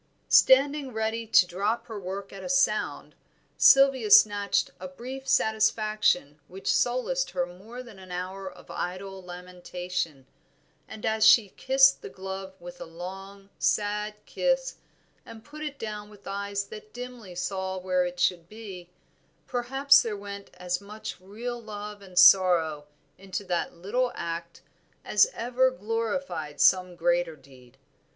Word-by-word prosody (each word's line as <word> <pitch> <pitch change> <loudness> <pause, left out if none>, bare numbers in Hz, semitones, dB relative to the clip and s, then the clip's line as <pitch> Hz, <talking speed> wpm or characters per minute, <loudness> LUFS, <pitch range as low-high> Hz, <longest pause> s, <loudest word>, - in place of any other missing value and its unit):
Standing 275 0 +5
ready 220 +1 -2
to 200 - +6
drop 200 +6 -2
her 220 -3 -7
work 195 +1 -6
at 195 -1 -9
a - - -6
sound, 275 0 +1 0.4
Sylvia 270 -5 +5
snatched 205 0 +5
a 185 - -6
brief 255 +8 -9
satisfaction 215 -8 +1
which 190 +2 -2
solaced 255 - 0
her 175 - -1
more 205 +8 -10
than 225 -6 -14
an 185 -1 -12
hour 185 +2 -5
of - - -14
idle 190 +2 -5
lamentation, 180 -4 -6 0.6
and 220 -1 -8
as 220 -1 +1
she 215 -1 +7
kissed 270 +5 +4
the - - -8
glove 190 0 -7
with 175 0 -11
a - - -5
long, 195 +4 -10
sad 210 0 0
kiss, - - -1 0.5
and 220 -1 -12
put 305 +1 -11
it 295 -2 -5
down 210 -3 -6
with 205 -1 -17
eyes 200 0 -3
that 215 +1 -12
dimly 245 -6 -9
saw 190 +1 -3
where 185 0 0
it 180 0 -5
should 175 -1 +1
be, 195 -5 -10 0.6
perhaps 270 +3 +4
there 215 -3 -4
went 200 0 -8
as 180 0 -3
much 215 +2 -8
real 235 +5 -6
love 210 -1 -8
and 185 -2 -14
sorrow 170 -6 +5 0.3
into 195 +1 -5
that 175 -3 -2
little 235 +9 -1
act 170 0 -6 0.4
as - - +5
ever 250 +2 +2
glorified 225 - -3
some 185 -1 +4
greater 175 -1 +1
deed. 130 -3 -19
200 Hz, 145 wpm, -27 LUFS, 180-230 Hz, 0.6 s, she